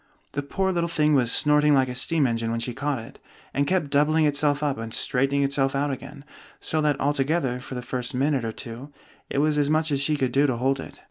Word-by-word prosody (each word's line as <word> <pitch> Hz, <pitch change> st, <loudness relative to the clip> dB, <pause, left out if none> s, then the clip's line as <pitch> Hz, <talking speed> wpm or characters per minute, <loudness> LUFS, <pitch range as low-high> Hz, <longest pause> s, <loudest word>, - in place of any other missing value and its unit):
The 145 Hz, -, -2 dB
poor 190 Hz, +7 st, -1 dB
little 170 Hz, -2 st, 0 dB
thing 155 Hz, -2 st, +2 dB
was 125 Hz, -4 st, +3 dB
snorting 150 Hz, 0 st, +4 dB
like 130 Hz, -1 st, +3 dB
a 125 Hz, -, -4 dB
steam 145 Hz, +4 st, +1 dB
engine 115 Hz, -2 st, -1 dB
when 115 Hz, 0 st, -1 dB
she 120 Hz, +1 st, -4 dB
caught 140 Hz, +2 st, -2 dB
it, 115 Hz, 0 st, -10 dB, 0.3 s
and 140 Hz, 0 st, 0 dB
kept 170 Hz, -5 st, 0 dB
doubling 155 Hz, +2 st, +3 dB
itself 145 Hz, 0 st, +1 dB
up 140 Hz, -5 st, -1 dB
and 115 Hz, 0 st, -6 dB
straightening 135 Hz, +3 st, +1 dB
itself 135 Hz, -1 st, 0 dB
out 145 Hz, +1 st, 0 dB
again; 135 Hz, +1 st, -8 dB, 0.3 s
so 155 Hz, -, -1 dB
that 150 Hz, -2 st, +1 dB
altogether, 140 Hz, -2 st, 0 dB
for 130 Hz, +1 st, -8 dB
the 125 Hz, -, -5 dB
first 125 Hz, 0 st, -2 dB
minute 135 Hz, 0 st, +1 dB
or 115 Hz, -, -2 dB
two, 120 Hz, +5 st, -8 dB, 0.4 s
it -, -, -3 dB
was 150 Hz, +1 st, +2 dB
as 145 Hz, -1 st, +2 dB
much 155 Hz, 0 st, +1 dB
as 140 Hz, -1 st, +1 dB
she 150 Hz, +2 st, +1 dB
could 130 Hz, -3 st, 0 dB
do 140 Hz, +3 st, +3 dB
to 125 Hz, -3 st, -1 dB
hold 135 Hz, +2 st, 0 dB
it. -, -, -9 dB
140 Hz, 240 wpm, -25 LUFS, 130-150 Hz, 0.4 s, snorting